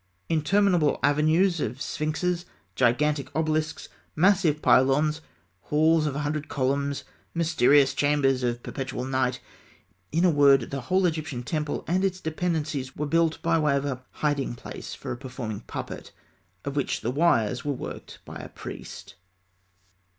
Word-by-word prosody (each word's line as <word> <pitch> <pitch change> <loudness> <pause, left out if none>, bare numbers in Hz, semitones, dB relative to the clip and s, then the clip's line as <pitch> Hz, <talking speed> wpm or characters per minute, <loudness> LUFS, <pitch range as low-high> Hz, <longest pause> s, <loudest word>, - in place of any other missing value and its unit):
Interminable 170 0 +3
avenues 160 +5 +3
of 125 -2 -3
sphinxes, 160 +5 -2 0.3
gigantic 140 +3 +1
obelisks, 155 0 -1 0.3
massive 175 -3 +3
pylons, 150 +4 +3 0.4
halls 155 +1 +3
of 140 - -3
a 145 - -2
hundred 150 +1 -2
columns, 140 +1 -1 0.3
mysterious 145 -4 +4
chambers 145 -3 +2
of 120 -1 -2
perpetual 130 -2 -4
night 130 -1 0 0.7
in 165 +4 +2
a 180 - +5
word, 140 -4 +4
the 135 -1 -3
whole 185 +9 +1
Egyptian 155 -7 -2
temple 150 +2 -3
and 185 +3 +1
its 185 -1 0
dependencies 155 -5 -2
were 150 - -2
built 165 +1 +1
by 165 0 +2
way 150 -2 +2
of 140 - -2
a 130 -2 -4
hiding 145 -5 -1
place - - -8
for - - -7
a - - -4
performing 120 -5 -6
puppet, - - -7 0.5
of 140 - -4
which 140 - -1
the 120 - -1
wires 130 -6 +2
were 145 - -1
worked 135 - -7
by - - -8
a - - -8
priest. - - -9
150 Hz, 145 wpm, -26 LUFS, 135-160 Hz, 0.7 s, a